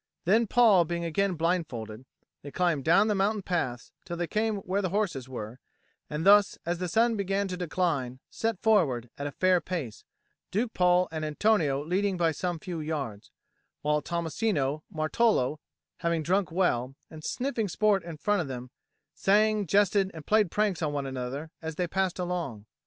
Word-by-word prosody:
Then, 220 +6 +3
Paul 215 -6 +5
being 170 +1 -3
again 185 +3 0
blindfolded, 130 -10 -2 0.4
they 145 - -8
climbed 160 -1 0
down 170 +8 +4
the 215 - +2
mountain 200 +1 0
paths 130 -11 -2
till 170 -1 -6
they 175 - -1
came 215 +4 0
where 190 +2 -1
the 185 - -1
horses 165 - -2
were, 120 -1 -7 0.5
and 150 +3 -3
thus, 205 0 +6
as 170 +1 -1
the 180 - -2
sun 230 +6 +2
began 200 0 -1
to 180 - -3
decline, 160 -8 -1
set 225 -4 -2
forward, 140 - +2
at 140 - -2
a - - -5
fair 185 +3 +2
pace, 155 - -5 0.5
Duke 225 +4 -1
Paul 180 0 +3
and 160 -1 -4
Antonio 150 -3 +1
leading 190 +3 0
by 165 -2 +2
some 175 +2 -3
few 170 +1 -6
yards; 140 -10 -4 0.5
while 150 0 +2
Tommasino 165 -3 -1
and - - -14
Martolo, 155 - +2 0.4
having 170 -1 -1
drunk 185 +2 +1
well, 135 -8 0 0.2
and 155 -1 -10
sniffing 245 -2 -2
sport 205 0 +2
in 165 -2 -8
front 205 +4 +1
of 160 - -4
them, 125 -1 -7 0.4
sang, 210 0 +2
jested, 200 +1 +3
and 155 -2 -9
played 215 -3 +3
pranks 205 -2 0
on 150 -2 -1
one 140 -1 -2
another 135 +4 -5
as 160 -1 -5
they 180 - 0
passed 190 +1 -1
along. 175 - -3
175 Hz, 175 wpm, -28 LUFS, 150-200 Hz, 0.5 s, thus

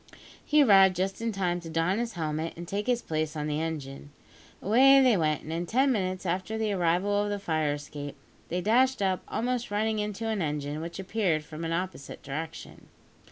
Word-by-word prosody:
He 300 -1 +4
arrived 195 -5 +6
just 190 +4 -2
in 230 0 -1
time 180 -3 -1
to 170 -1 -9
don 165 +5 0
his 235 -1 -3
helmet 160 -1 -3
and 170 0 -7
take 205 +4 -3
his 245 -1 +1
place 155 -1 -2
on 150 -1 -3
the 150 +1 -1
engine. 145 -3 -5 0.5
Away 265 +6 +6
they 255 -4 +5
went, 155 -4 0
and 160 - -5
in 170 +1 -3
ten 265 +6 +3
minutes 185 -5 -2
after 185 +5 -2
the 220 -1 0
arrival 185 +3 +1
of 205 - -2
the 205 - -1
fire 155 -6 0
escape, 145 -1 -7 0.3
they 180 +1 -1
dashed 250 +3 +3
up, 190 -1 +1
almost 245 +1 -2
running 215 +1 0
into 210 +2 -3
an 220 -3 -1
engine 150 -1 -3
which 170 +1 -6
appeared 190 -5 0
from 155 +1 -8
an 165 - -2
opposite 180 -4 -4
direction. 160 +4 -7
185 Hz, 200 wpm, -28 LUFS, 160-215 Hz, 0.5 s, arrived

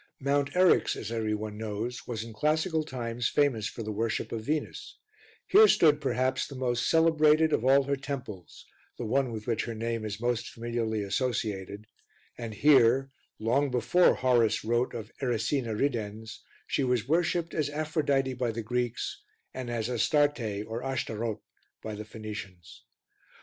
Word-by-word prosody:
Mount 140 +1 +1
Eryx, 185 0 +4
as 110 - -6
every 110 -2 -1
one 105 0 -6
knows, 110 +4 -4
was 115 -3 -3
in 115 -1 -9
classical 155 - +1
times 120 -4 -3
famous 125 -8 +1
for 115 - -6
the 110 - -4
worship 110 +1 -2
of 115 - -3
Venus: 150 +5 -3 0.5
here 430 +2 +7
stood 150 - +4
perhaps 130 -2 0
the 140 - -9
most 120 -2 0
celebrated 160 -1 +4
of - - +1
all 135 +2 +5
her 140 +1 0
temples 130 - -7 0.3
the 120 - -4
one 130 +2 +1
with 110 -1 -6
which 115 -2 -1
her 115 - -5
name 115 0 -3
is 105 -1 -4
most 120 0 -1
familiarly 115 -2 -2
associated 105 -2 -2 0.5
and 115 -3 -6
here, 135 0 +4 0.3
long 130 +6 +1
before 135 +8 +3
Horace 120 -4 +2
wrote 120 +2 0
of 110 -1 -7
"Erycina 120 -1 -1
ridens," 110 -5 -2 0.3
she 140 - 0
was 125 -3 0
worshipped 170 +1 +1
as 150 -3 0
Aphrodite 145 -3 0
by 125 -1 -1
the 115 0 -5
Greeks, 120 +1 -2 0.3
and 130 -2 -5
as 115 -2 -2
Astarte 120 -4 +1
or 115 +2 -5
Ashtaroth 115 -5 -3 0.4
by 110 - -5
the 105 +1 -7
Phoenicians. 105 -6 -9
120 Hz, 155 wpm, -29 LUFS, 110-140 Hz, 0.5 s, here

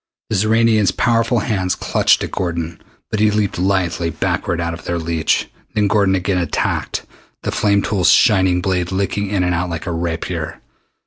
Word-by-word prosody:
The - - +1
Xoranian's 110 0 +3
powerful 115 0 +1
hands 95 -5 -1
clutched - - +2
at - - -5
Gordon, 85 -2 -3 0.3
but 110 - -1
he 105 0 +4
leaped 105 -3 -1
lithely 90 -3 0
backward 85 +1 -2
out 85 0 -2
of 85 - -9
their 85 - -1
reach. 80 -1 0 0.3
Then 105 - +2
Gordon 100 -2 +3
again 95 0 0
attacked, 85 -4 -2 0.4
the - - -1
flame 100 -1 +2
tool's 95 -4 +2
shining 95 -4 +4
blade 90 -1 -1
licking 100 +1 -1
in 100 -2 0
and 90 0 +1
out 90 +1 -1
like 85 -1 -5
a 90 - -3
rapier. 85 -1 -3
95 Hz, 175 wpm, -18 LUFS, 85-105 Hz, 0.4 s, he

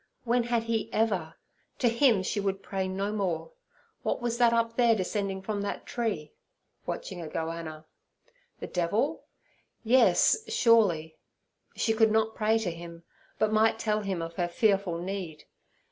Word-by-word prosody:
When 245 +1 +2
had 235 -1 0
He 225 0 -2
ever? 200 -9 0 0.4
To 245 - +2
Him 235 -4 +3
she 205 - -1
would 195 -1 -2
pray 190 -1 -2
no 195 +2 -2
more. 195 - -2 0.5
What - - -1
was 240 -1 -2
that 240 -1 +5
up 230 0 +1
there 235 -2 +4
descending 195 -1 -2
from 205 0 -2
that 200 - -4
tree? 215 -11 -3 0.5
(watching 180 -2 -5
a 165 - -6
gohanna). 160 0 -5 0.7
The - - -5
devil? 205 - -1 0.6
Yes, 250 - +4
surely. 205 - +3 0.6
She 225 - +1
could 220 -1 +4
not 220 0 +2
pray 220 +1 +2
to 215 -6 -2
him, 170 0 -10 0.3
but 215 0 +1
might 220 +1 +3
tell 215 -1 0
him 190 -4 -3
of 165 0 -6
her 175 -2 +1
fearful 195 -3 +1
need. 180 -3 -5
205 Hz, 155 wpm, -28 LUFS, 175-230 Hz, 0.7 s, that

